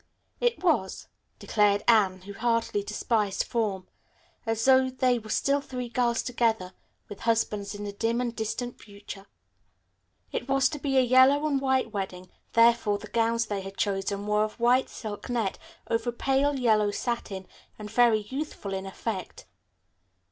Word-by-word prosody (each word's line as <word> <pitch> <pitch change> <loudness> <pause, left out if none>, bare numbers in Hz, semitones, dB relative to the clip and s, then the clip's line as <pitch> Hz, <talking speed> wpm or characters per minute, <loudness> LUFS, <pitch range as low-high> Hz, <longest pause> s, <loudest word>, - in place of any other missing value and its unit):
"It 480 -5 0
was," 270 - 0 0.3
declared 205 -1 +2
Anne, 195 -5 +4
who 200 +2 -9
heartily 230 -1 0
despised 210 -1 0
form, 205 -5 -2 0.6
"as 225 0 0
though 260 0 +5
they 255 -1 +1
were 215 -1 -12
still 280 +5 +1
three 250 -3 -6
girls 240 -1 +1
together, 225 -6 0 0.3
with 205 - -9
husbands 210 -3 0
in 205 - -6
the 205 - -4
dim 225 +3 -1
and 240 -2 -2
distant 225 +2 -4
future." 200 -1 -11 1.0
It 245 - -4
was 270 0 +3
to 295 - -6
be 275 -1 0
a - - +7
yellow 260 +4 +5
and 280 -3 +1
white 265 -4 +1
wedding, 185 -2 -5 0.2
therefore 230 -3 +4
the 210 +1 -11
gowns 230 0 +1
they 205 -2 -3
had 195 +1 -9
chosen 200 -2 -1
were 210 0 +2
of 215 +2 -5
white 245 +2 +3
silk 215 +2 -7
net 230 -6 -1 0.3
over 230 +1 0
pale 270 +3 +1
yellow 215 -4 +3
satin, 205 -4 -4 0.3
and 210 -1 -8
very 230 -2 +4
youthful 260 -3 -5
in 190 0 -4
effect. 190 0 -5
225 Hz, 155 wpm, -27 LUFS, 205-250 Hz, 1.0 s, a